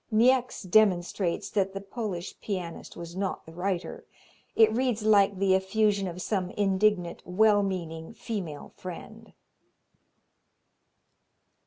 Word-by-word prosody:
Niecks 250 Hz, +2 st, +3 dB
demonstrates 185 Hz, -2 st, +2 dB
that 195 Hz, -2 st, 0 dB
the -, -, -2 dB
Polish 195 Hz, -3 st, -5 dB
pianist 180 Hz, -5 st, -5 dB
was 170 Hz, 0 st, -8 dB
not 190 Hz, 0 st, -3 dB
the 160 Hz, -, -12 dB
writer. 180 Hz, +1 st, -3 dB, 0.5 s
It 220 Hz, -1 st, +5 dB
reads 240 Hz, -2 st, 0 dB
like 200 Hz, -2 st, +4 dB
the 195 Hz, 0 st, +3 dB
effusion 200 Hz, +1 st, +1 dB
of 180 Hz, +1 st, -6 dB
some 190 Hz, -4 st, -1 dB
indignant, 195 Hz, -3 st, +1 dB
well 205 Hz, +3 st, +4 dB
meaning 170 Hz, -2 st, -4 dB
female 175 Hz, -10 st, -6 dB
friend. 180 Hz, -2 st, -9 dB
195 Hz, 115 wpm, -28 LUFS, 180-215 Hz, 0.5 s, It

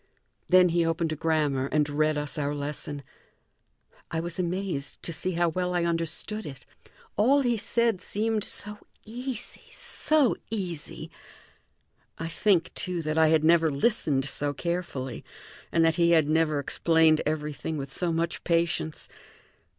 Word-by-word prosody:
Then 180 Hz, 0 st, +6 dB
he 170 Hz, 0 st, +2 dB
opened 165 Hz, 0 st, 0 dB
a -, -, -3 dB
grammar 150 Hz, -4 st, +1 dB
and 150 Hz, 0 st, +1 dB
read 155 Hz, +1 st, +1 dB
us 150 Hz, +1 st, -3 dB
our 145 Hz, 0 st, -1 dB
lesson. 145 Hz, 0 st, -4 dB, 1.1 s
I 165 Hz, -, -2 dB
was 170 Hz, +2 st, -4 dB
amazed 180 Hz, -5 st, -2 dB
to 170 Hz, -, -3 dB
see 185 Hz, +4 st, -1 dB
how 170 Hz, 0 st, +2 dB
well 180 Hz, +2 st, -2 dB
I 175 Hz, -, +1 dB
understood 170 Hz, +6 st, -2 dB
it. 135 Hz, -5 st, -9 dB, 0.5 s
All 270 Hz, +7 st, +4 dB
he 240 Hz, -2 st, +2 dB
said 230 Hz, -2 st, 0 dB
seemed 215 Hz, 0 st, -1 dB
so 210 Hz, +1 st, 0 dB, 0.3 s
easy, 245 Hz, +1 st, -5 dB
so 305 Hz, -5 st, +1 dB
easy! 180 Hz, -8 st, -5 dB, 1.1 s
I 165 Hz, -, -4 dB
think, 180 Hz, 0 st, +2 dB
too, 180 Hz, -2 st, -3 dB
that 155 Hz, +1 st, 0 dB
I 160 Hz, -, +6 dB
had 155 Hz, -1 st, +3 dB
never 165 Hz, 0 st, +5 dB
listened 145 Hz, -, +1 dB
so 145 Hz, +1 st, -2 dB
carefully, 170 Hz, -8 st, -3 dB, 0.5 s
and 165 Hz, -1 st, +3 dB
that 165 Hz, +1 st, +2 dB
he 170 Hz, 0 st, +4 dB
had 160 Hz, -3 st, +4 dB
never 155 Hz, -1 st, +2 dB
explained 160 Hz, +2 st, +3 dB
everything 150 Hz, 0 st, -3 dB
with 135 Hz, -1 st, -6 dB
so 175 Hz, -2 st, 0 dB
much 165 Hz, +1 st, -2 dB
patience. 165 Hz, -2 st, 0 dB
165 Hz, 150 wpm, -27 LUFS, 150-180 Hz, 1.1 s, Then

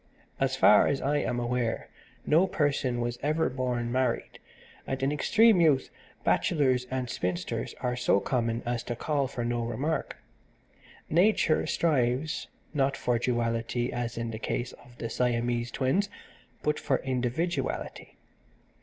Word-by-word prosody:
So 135 Hz, -, +3 dB
far 130 Hz, -5 st, +5 dB
as 140 Hz, -, 0 dB
I 145 Hz, +2 st, +1 dB
am 120 Hz, -4 st, -1 dB
aware 120 Hz, -1 st, -1 dB, 0.4 s
no 165 Hz, +5 st, +4 dB
person 140 Hz, -7 st, 0 dB
was 120 Hz, 0 st, -3 dB
ever 155 Hz, +1 st, +1 dB
born 125 Hz, -2 st, -2 dB
married, 130 Hz, -1 st, -1 dB, 0.5 s
and 135 Hz, 0 st, -3 dB
in 135 Hz, -, +2 dB
extreme 215 Hz, +6 st, +4 dB
youth 145 Hz, -5 st, +3 dB, 0.3 s
bachelors 130 Hz, -6 st, +2 dB
and 130 Hz, -1 st, -2 dB
spinsters 90 Hz, +3 st, -3 dB
are 125 Hz, -1 st, 0 dB
so 125 Hz, -4 st, +2 dB
common 115 Hz, +1 st, -1 dB
as 120 Hz, -1 st, -1 dB
to 120 Hz, -, -3 dB
call 140 Hz, +2 st, 0 dB
for 120 Hz, -2 st, -4 dB
no 120 Hz, 0 st, -1 dB
remark. 145 Hz, +7 st, -2 dB, 0.9 s
Nature 170 Hz, -2 st, +3 dB
strives, 145 Hz, 0 st, 0 dB, 0.3 s
not 135 Hz, -2 st, +1 dB
for 120 Hz, -1 st, 0 dB
duality 120 Hz, 0 st, -1 dB
as 120 Hz, -1 st, -3 dB
in 115 Hz, 0 st, -3 dB
the 110 Hz, -, -6 dB
case 120 Hz, +2 st, -3 dB
of 120 Hz, -1 st, -17 dB
the 115 Hz, -, -4 dB
Siamese 120 Hz, 0 st, 0 dB
Twins 135 Hz, -, 0 dB, 0.5 s
but 150 Hz, 0 st, +1 dB
for 135 Hz, -3 st, +1 dB
individuality. 130 Hz, +7 st, -3 dB
125 Hz, 140 wpm, -28 LUFS, 120-145 Hz, 0.9 s, far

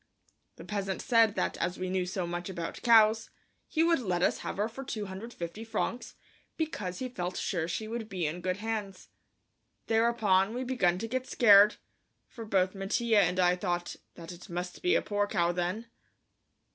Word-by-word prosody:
The -, -, -11 dB
peasant 195 Hz, -2 st, -3 dB
said 225 Hz, -3 st, +3 dB
that -, -, -1 dB
as 180 Hz, -, -2 dB
we 185 Hz, -, -3 dB
knew 185 Hz, -1 st, -1 dB
so 185 Hz, -1 st, -2 dB
much 175 Hz, +2 st, -4 dB
about 170 Hz, -3 st, -5 dB
cows, 225 Hz, -1 st, +5 dB, 0.4 s
he 320 Hz, -1 st, +1 dB
would 335 Hz, -2 st, +3 dB
let 180 Hz, -7 st, -1 dB
us -, -, +2 dB
have -, -, -5 dB
her 205 Hz, +2 st, +1 dB
for 240 Hz, +4 st, -8 dB
250 205 Hz, -4 st, -6 dB
francs, 225 Hz, +2 st, -3 dB, 0.4 s
because 210 Hz, -, -3 dB
he 255 Hz, -, -3 dB
felt 185 Hz, -7 st, -4 dB
sure 170 Hz, -4 st, -1 dB
she 215 Hz, +5 st, -3 dB
would 225 Hz, -1 st, -5 dB
be 180 Hz, -5 st, -2 dB
in 160 Hz, +4 st, -3 dB
good 185 Hz, +1 st, -1 dB
hands. 210 Hz, -3 st, -5 dB, 0.8 s
Thereupon 225 Hz, -3 st, +2 dB
we 255 Hz, -, -2 dB
began 220 Hz, -9 st, +1 dB
to 225 Hz, -, -4 dB
get 255 Hz, +2 st, -3 dB
scared, 210 Hz, -2 st, +6 dB, 0.5 s
for 230 Hz, -2 st, -9 dB
both 190 Hz, -3 st, +1 dB
Mattia 210 Hz, +3 st, +1 dB
and 180 Hz, -1 st, +2 dB
I 180 Hz, 0 st, +4 dB
thought 175 Hz, -1 st, -3 dB, 0.2 s
that 165 Hz, 0 st, -9 dB
it 175 Hz, 0 st, -12 dB
must 175 Hz, +1 st, -5 dB
be 360 Hz, +4 st, +3 dB
a -, -, +2 dB
poor 205 Hz, 0 st, 0 dB
cow 175 Hz, -3 st, +1 dB
then. 180 Hz, +6 st, -2 dB
200 Hz, 180 wpm, -30 LUFS, 180-225 Hz, 0.8 s, scared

